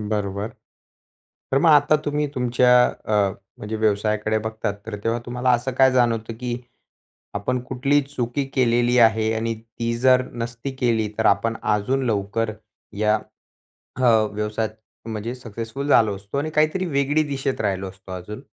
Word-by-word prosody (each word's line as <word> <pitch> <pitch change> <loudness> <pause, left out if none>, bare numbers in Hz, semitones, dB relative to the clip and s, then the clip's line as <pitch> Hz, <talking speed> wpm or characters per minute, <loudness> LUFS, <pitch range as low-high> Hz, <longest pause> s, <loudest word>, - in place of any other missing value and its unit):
बरोबर. 105 0 -2 1.0
तर 135 - +4
मग 165 - +4
आता 150 0 +6
तुम्ही 150 0 0
तुमच्या 125 0 +3
अ, 110 - -4 0.4
म्हणजे 105 +1 -5
व्यवसायाकडे 110 0 +1
बघतात. 110 -1 -3
तर 115 - -5
तेव्हा 115 +1 0
तुम्हाला 125 +1 0
असं 125 +2 +1
काय 130 -1 +6
जाणवतं, 115 -3 +1
की 120 +1 -4 0.8
आपण 125 +5 -1
कुठलीही 135 +3 +1
चुकी 135 -1 -3
केलेली 120 -1 +3
आहे 110 -1 +4
आणि 115 +1 -1
ती 115 +1 -4
जर 130 0 +5
नसती 115 +2 -5
केली 115 -4 +1
तर 110 - +2
आपण 115 +3 +2
अजून 115 +6 +1
लवकर 110 +1 -1 0.5
या 105 0 +3 0.8
हं, 115 -4 +4
व्यवसायात 105 +1 -2 0.4
म्हणजे 110 +2 -4
सक्सेसफुल 115 +3 -6
झालो 110 -7 +4
असतो, 100 +7 -6
आणि 155 +2 -2
काहीतरी 155 +5 +1
वेगळी 145 0 +1
दिशेत 135 -1 -2
राहिलो 95 -2 -1
असतो 95 0 -12
अजून? 105 +7 -7
115 Hz, 145 wpm, -23 LUFS, 110-130 Hz, 1.0 s, आता